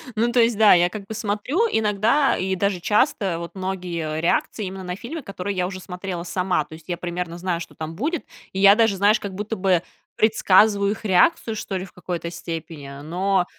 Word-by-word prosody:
Ну, 235 +2 +1
то 245 - +2
есть, 230 -2 +3
да, 215 -2 +7
я 175 0 +4
как 205 -1 -7
бы 220 - -7
смотрю 220 - 0
иногда 220 +6 +2
и 190 0 -1
даже 195 -1 0
часто 205 - +1
вот 170 - -6
многие 175 -5 -3
реакции 185 +5 0
именно 190 0 -6
на 180 0 -4
фильмы, 275 +9 -7
которые 195 -2 -5
я 180 0 0
уже 185 -1 -6
смотрела 180 -1 -6
сама. 180 -3 0
То - - -14
есть, 160 +2 -13
я 175 - -2
примерно 175 -1 -4
знаю, 175 -1 -2
что - - -9
там 160 +1 -6
будет. 310 - -2 0.3
И 190 - -4
я 200 +1 +8
даже, 220 -3 +3
знаешь, 210 +3 +4
как 200 -2 -6
будто 210 +2 -3
бы 185 -3 +2 0.3
предсказываю 205 -1 +4
их 215 +1 -6
реакцию, 220 - +3
что 195 -2 -4
ли, 185 - -5
в - - -15
какой-то 175 -1 -5
степени. 160 -5 -7
Но 180 +3 +1
190 Hz, 210 wpm, -23 LUFS, 175-215 Hz, 0.3 s, я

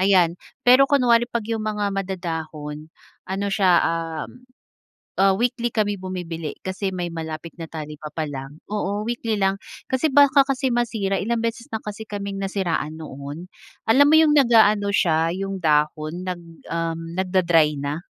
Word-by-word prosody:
ayan. 180 -3 +3 0.2
Pero 255 +3 +7
kunwari 240 -4 +4
'pag 235 -3 -2
'yong 225 0 -2
mga 210 -2 -1
madadahon, 160 -5 -5 0.4
ano 195 +1 -2
siya 195 -3 +3
uhm, 165 -1 -2 0.9
ah, 195 0 +5
weekly 240 0 0
kami 205 -2 0
bumibili. 170 -4 -5
Kasi 190 +1 -2
may 175 -1 -3
malapit 160 0 -6
na 165 - -5
talipapa 155 0 -6
lang, 135 +2 -8
oo, 210 0 -1
weekly 230 -1 -2
lang. 195 0 +2 0.3
Kasi 260 +4 +2
baka 285 -1 +7
kasi 265 -1 0
masira, 220 -5 0
ilang 230 +2 -1
beses 230 +1 -3
na 220 - -3
kasi 210 +1 -6
kaming 200 -1 -5
nasiraan 175 -6 -2
noon. 145 +5 -8 0.4
Alam 270 +6 +7
mo 310 - +6
'yong 315 -2 +5
nag-aano 220 -5 +5
siya, 165 -2 +2
'yong 195 0 -3
dahon, 155 +2 0
nag 180 -2 -4 0.3
uhm, 165 0 -3
nagda-dry 175 -5 +3
na. 145 +4 -3
190 Hz, 150 wpm, -23 LUFS, 165-220 Hz, 0.9 s, Pero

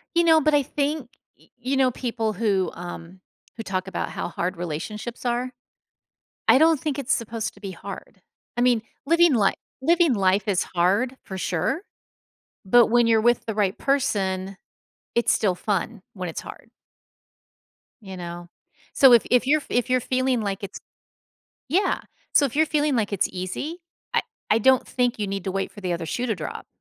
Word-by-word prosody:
You 340 - +5
know, 320 -1 +6
but 305 +1 +2
I 290 - +5
think, 285 -1 -2 0.3
y - - -24
you 255 +3 -2
know, 260 -1 +4
people 230 -3 -2
who, 200 -3 0
um, 175 +1 -9 0.4
who 225 - -5
talk 185 -2 -3
about 190 - -3
how - - -4
hard 180 +1 -3
relationships 210 +9 -5
are, 245 +1 -1 1.0
I - - +8
don't 320 -1 +4
think 295 -1 -2
it's 265 -1 -1
supposed 230 -1 -3
to 200 - -18
be 195 - -6
hard. 195 +1 -9 0.4
I - - 0
mean, 245 -3 +3 0.2
living 335 -1 +5
li 205 -4 +3 0.3
living 335 -1 +4
life 195 +1 +2
is 190 -3 +2
hard 200 +9 +2
for 190 - -7
sure, 185 - -1 0.8
but 235 +4 +6
when 240 0 +4
you're 225 -1 +4
with 240 +1 +2
the 220 - -2
right 200 -2 +1
person, 195 -8 0 0.6
it's 235 - +3
still 195 -4 +1
fun 205 +2 -2
when 185 -3 -5
it's 160 - -5
hard. - - -11 1.3
You 190 -3 -9
know? 175 0 -7 0.4
So, 265 -3 +7
if 235 - +6
if 250 +1 +4
you're 305 +2 +4
if 245 +1 0
you're 255 0 +3
feeling 255 0 0
like 200 -1 -3
it's 200 - -6 0.9
yeah. 360 +9 +1 0.3
So, 290 - +6
if 275 - -7
you're 315 - +4
feeling 295 -3 +1
like 215 -3 0
it's 200 - +1
easy, 235 - -5 0.3
I - - +3 0.3
I 215 - +5
don't 260 +3 +4
think 245 -2 0
you 210 - -1
need 195 -1 -4
to 190 - -2
wait 195 0 -2
for 205 - -11
the 180 -2 -2
other 170 -1 -3
shoe 245 +10 -2
to 225 - 0
drop. 160 -5 -7
225 Hz, 185 wpm, -24 LUFS, 190-260 Hz, 1.3 s, I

